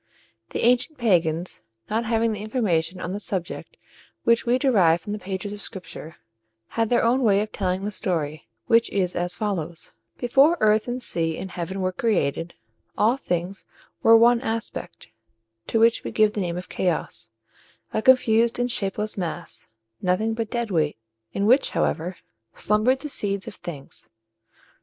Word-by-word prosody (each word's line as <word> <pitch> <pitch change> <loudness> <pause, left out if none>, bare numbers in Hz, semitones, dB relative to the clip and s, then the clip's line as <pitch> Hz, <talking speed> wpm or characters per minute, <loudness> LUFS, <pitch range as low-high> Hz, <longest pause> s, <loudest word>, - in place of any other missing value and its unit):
The - - -3
ancient 250 +6 +2
pagans, 175 -6 +1 0.3
not 225 +2 -1
having 225 0 +1
the 210 -2 -4
information 190 -7 0
on 180 - -4
the 205 - -3
subject 185 -4 -5 0.5
which 235 0 +3
we 245 +1 +4
derive 195 - +4
from 205 +5 -6
the 210 - -4
pages 195 +1 -5
of 205 - -8
Scripture, 180 -5 -8 0.5
had 225 -1 0
their 240 - +3
own 245 +3 +3
way 205 -5 +4
of 215 - -4
telling 185 -1 -1
the 205 - -2
story, 155 - -2 0.2
which 230 0 +4
is 185 -3 -1
as 175 +1 -1
follows: 175 -6 -3 0.3
Before 275 +7 +4
earth 215 +1 +3
and 245 +1 -3
sea 165 -5 0
and 190 0 -6
heaven 185 +3 -4
were 185 0 0
created, 175 -5 -1 0.4
all 225 +4 +4
things 180 -6 -3 0.3
wore 225 0 +8
one 235 +1 +5
aspect, 225 - -5 0.6
to 225 - +1
which 230 +1 +4
we - - -4
give 215 -1 +3
the 205 - -2
name 175 -1 -2
of 180 - -6
Chaos 180 -2 -2 0.6
a 220 - +1
confused 235 -2 +4
and 245 0 0
shapeless 210 -2 -1
mass, 175 -1 -4 0.3
nothing 195 +5 +1
but 225 -1 -3
dead 235 -3 -2
weight, 155 -7 +1 0.3
in 200 - -1
which, 255 +6 +4
however, 175 +3 -1 0.4
slumbered 225 +6 +2
the 300 - -4
seeds 200 -8 -2
of - - -6
things. 150 -8 -9
205 Hz, 165 wpm, -24 LUFS, 180-230 Hz, 0.6 s, wore